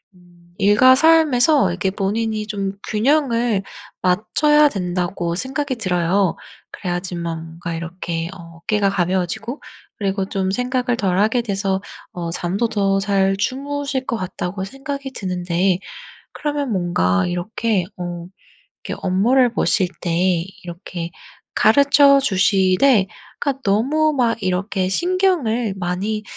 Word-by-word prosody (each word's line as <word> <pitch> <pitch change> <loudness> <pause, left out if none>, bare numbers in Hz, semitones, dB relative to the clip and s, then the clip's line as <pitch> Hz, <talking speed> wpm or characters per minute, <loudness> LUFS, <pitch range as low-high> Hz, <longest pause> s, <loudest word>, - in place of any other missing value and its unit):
음 175 -1 -23
'일과 210 +6 +6
삶에서 300 - +4
이렇게 180 +2 -1
본인이 215 +2 -2
좀 200 -2 -3
균형을 235 -3 +1 0.4
맞춰야 295 +11 +3
된다.'고 180 -3 -2
생각이 265 +5 -2
들어요. 185 -2 +1 0.4
그래야지만 175 -3 -4
뭔가 165 +1 -7
이렇게 165 0 -4
어 165 -2 -12
'어깨가 200 +4 0
가벼워지고 190 - -2 0.4
그리고 195 -1 -1
좀 190 -2 -1
생각을 250 +2 0
덜 185 -4 0
하게 220 +4 +2
돼서 195 -3 -1 0.3
어 170 -1 -4
잠도 190 +7 -1
더 195 -2 +1
잘 195 -1 +1
주무실 275 +3 -2
것 - - -1
같다.'고 185 0 -4
생각이 275 +3 -6
드는데 180 -1 0 0.5
그러면 290 -3 -2
뭔가 135 - +1
이렇게 185 +3 -1
어 175 -1 -5 0.6
이렇게 - - -5
'업무를 235 +7 +3
보실 190 -2 +2
때 175 0 +1 0.2
이렇게 175 -1 -6 0.4
가르쳐 280 +4 +5
주시되 195 0 +3 0.3
그러니까 275 -1 -2
너무 280 +10 +2
막 235 -4 0
이렇게 185 +1 -1
신경을 320 - +1
많이 190 +4 -2
195 Hz, 270 characters per minute, -20 LUFS, 180-250 Hz, 0.6 s, 일과